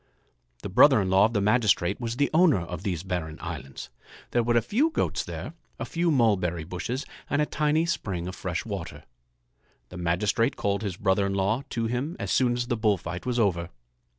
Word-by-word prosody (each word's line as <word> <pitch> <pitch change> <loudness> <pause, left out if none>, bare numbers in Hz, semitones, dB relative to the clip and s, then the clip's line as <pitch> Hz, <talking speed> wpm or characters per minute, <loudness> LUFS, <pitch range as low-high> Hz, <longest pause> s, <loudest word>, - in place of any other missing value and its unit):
The - - -4
brother - - +6
in 95 -1 -1
law 95 +2 +6
of 115 - -1
the 100 - +1
magistrate 105 -3 +2
was 115 0 -3
the 145 +2 +1
owner 160 - +5
of 85 - -6
these 90 -5 -3
barren 90 -4 -4
islands. 65 0 -7 0.4
There 120 - +2
were 120 0 +2
a - - +4
few 255 - +2
goats 325 - -1
there, - - -7 0.2
a - - -4
few 170 +1 0
mulberry 100 - +2
bushes, 90 - -4 0.2
and 145 - +1
a 150 - +3
tiny 155 +2 +1
spring 95 - -3
of 90 - -6
fresh 85 -4 -3
water. 85 -8 -6 0.9
The 90 - -9
magistrate 105 +9 +1
called 100 0 -1
his 100 -5 -4
brother 100 0 +2
in 100 - -2
law 100 +6 +1
to 115 -1 -2
him 125 +9 -2
as - - -3
soon 125 -2 +3
as 120 0 -1
the 120 -1 -1
bull 105 -2 +2
fight 85 +5 -6
was 125 -1 0
over. 90 -7 +1
105 Hz, 205 wpm, -26 LUFS, 90-120 Hz, 0.9 s, brother